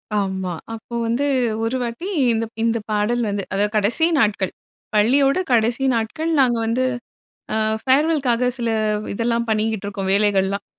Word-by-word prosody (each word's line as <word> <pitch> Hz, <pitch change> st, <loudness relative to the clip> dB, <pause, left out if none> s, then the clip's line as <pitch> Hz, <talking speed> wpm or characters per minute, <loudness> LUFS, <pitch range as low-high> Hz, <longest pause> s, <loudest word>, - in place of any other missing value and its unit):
ஆமாம். 190 Hz, -4 st, -2 dB
அப்போ 225 Hz, +1 st, -8 dB
வந்து 235 Hz, +5 st, 0 dB, 0.4 s
ஒரு 230 Hz, +3 st, 0 dB
வாட்டி, 235 Hz, +10 st, -5 dB, 0.3 s
இந்த 225 Hz, 0 st, 0 dB, 0.2 s
இந்த 230 Hz, 0 st, +2 dB
பாடல் 215 Hz, +3 st, +1 dB
வந்து 200 Hz, -1 st, -2 dB
அதாவது 205 Hz, +2 st, +1 dB
கடைசி 220 Hz, +10 st, +2 dB
நாட்கள். 205 Hz, -5 st, +1 dB, 0.4 s
பள்ளியோட 270 Hz, -, +3 dB
கடைசி 235 Hz, +3 st, +2 dB
நாட்கள், 270 Hz, +9 st, -2 dB
நாங்க 245 Hz, -3 st, +3 dB
வந்து 235 Hz, +3 st, 0 dB, 0.7 s
அ -, -, 0 dB, 0.3 s
ஃபேர்வெல்‌க்காக 265 Hz, -3 st, +2 dB
சில 235 Hz, -1 st, -1 dB, 0.4 s
இதெல்லாம் 235 Hz, +2 st, -1 dB
பண்ணிக்கிட்டு 215 Hz, -2 st, 0 dB
இருக்கோம், 195 Hz, -1 st, -3 dB
வேலைகள்லாம். 200 Hz, -1 st, +1 dB
225 Hz, 135 wpm, -21 LUFS, 205-245 Hz, 0.7 s, பள்ளியோட